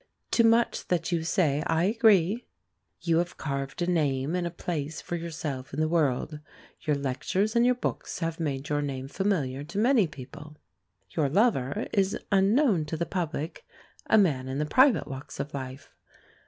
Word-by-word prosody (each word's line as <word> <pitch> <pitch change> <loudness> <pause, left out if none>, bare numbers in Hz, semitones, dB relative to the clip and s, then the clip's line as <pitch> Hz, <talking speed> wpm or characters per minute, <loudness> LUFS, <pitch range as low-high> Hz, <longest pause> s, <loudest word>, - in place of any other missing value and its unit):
To 230 - +4
much 230 +1 +3
that 180 -1 0
you 170 -2 +1
say 160 -4 +1
I 165 +1 +2
agree. 215 0 +3 0.5
You 165 -1 +2
have 175 0 -3
carved 140 +2 -3
a - - +1
name 150 -4 0
and 180 -1 0
a - - -2
place 160 -3 -4
for 175 - -5
yourself 155 -6 -5
in - - -3
the 155 - +2
world. 150 -2 0 0.4
Your 150 - 0
lectures, 140 - -1
and 235 +1 +5
your 250 - +4
books, 250 - -4
have 165 -1 -3
made 140 -3 -2
your 145 -1 0
name 135 -2 -4
familiar 145 -7 -1
to 170 +5 -8
many 230 -3 +4
people. 150 +2 -11 0.5
Your 145 +4 +1
lover 155 - +1
is 195 -1 +2
unknown 200 - +3
to 160 - -4
the 170 - -1
public, 170 - -4 0.4
a 220 - +5
man 145 -11 +2
in 130 +1 -3
the 150 - 0
private 255 - +4
walks 135 -1 -8
of 145 +2 -4
life. 130 -1 -7
160 Hz, 175 wpm, -27 LUFS, 140-190 Hz, 0.5 s, and